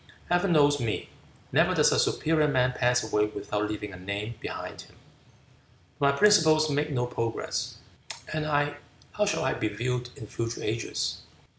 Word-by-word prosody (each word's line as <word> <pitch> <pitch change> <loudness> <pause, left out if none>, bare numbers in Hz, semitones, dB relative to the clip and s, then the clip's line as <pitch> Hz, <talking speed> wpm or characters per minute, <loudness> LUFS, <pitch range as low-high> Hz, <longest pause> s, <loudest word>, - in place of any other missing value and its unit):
Heaven 175 +1 +2
knows 145 -2 +4
me. 115 -4 -2 0.4
Never - - +3
does - - +5
a - - +3
superior 155 -1 +2
man 125 -3 +2
pass 125 0 +2
away 105 -1 +1
without 105 0 -3
leaving 105 -2 -5
a - - -8
name 100 +4 -4
behind - - -6
him. - - -17 1.0
But 140 0 +4
my - - -4
principles 155 -7 +5
make 145 +2 0
no 125 -4 0
progress, 115 -2 -3 0.6
and 155 0 -1
I, 145 -1 +1 0.3
how 210 0 0
shall - - 0
I 130 - +2
be 110 - -1
viewed 125 +4 -2
in 110 - -9
future 115 +2 -4
ages?" 115 +1 -2
125 Hz, 165 wpm, -27 LUFS, 110-150 Hz, 1.0 s, does